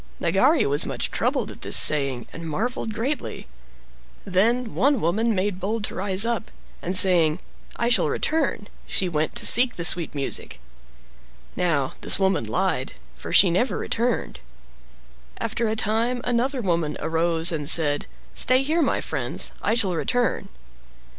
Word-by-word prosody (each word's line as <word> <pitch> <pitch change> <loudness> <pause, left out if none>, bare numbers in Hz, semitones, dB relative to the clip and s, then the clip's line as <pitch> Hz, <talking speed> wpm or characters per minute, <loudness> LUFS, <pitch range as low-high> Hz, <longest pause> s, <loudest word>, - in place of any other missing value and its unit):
Nagari 255 - +2
was 145 +1 +3
much - - -3
troubled - - -1
at - - -14
this - - +1
saying, 140 -5 +1
and 165 -1 -7
marveled 225 +7 -3
greatly. 260 +7 -4 0.8
Then 220 +5 0
one 280 -1 +1
woman 215 +6 0
made 185 0 -2
bold 210 +3 -3
to - - -3
rise 195 +1 +2
up, 235 -4 -2 0.3
and 180 +2 -1
saying, 170 -5 +5 0.4
"I 235 - -1
shall 240 - +2
return," 295 -9 -1 0.2
she 190 - -1
went 155 -2 -2
to - - 0
seek 245 +1 +6
the 170 - -2
sweet 170 -3 +4
music. 140 -1 -4 1.0
Now 150 -7 -1
this - - +6
woman 190 -1 +1
lied, - - -2 0.2
for - - -9
she 185 - +6
never 240 +9 0
returned. 230 - -2 1.0
After 230 +1 -2
a 220 - -1
time, 225 +3 -1
another 245 +2 -1
woman 170 -6 -2
arose 165 +1 +1
and 150 -3 -3
said, 145 -3 +1 0.3
"Stay 255 +1 +2
here, 315 +5 0
my 295 - 0
friends; - - -1
I - - 0
shall 200 -6 +1
return." 240 +1 -1
195 Hz, 150 wpm, -23 LUFS, 165-235 Hz, 1.0 s, seek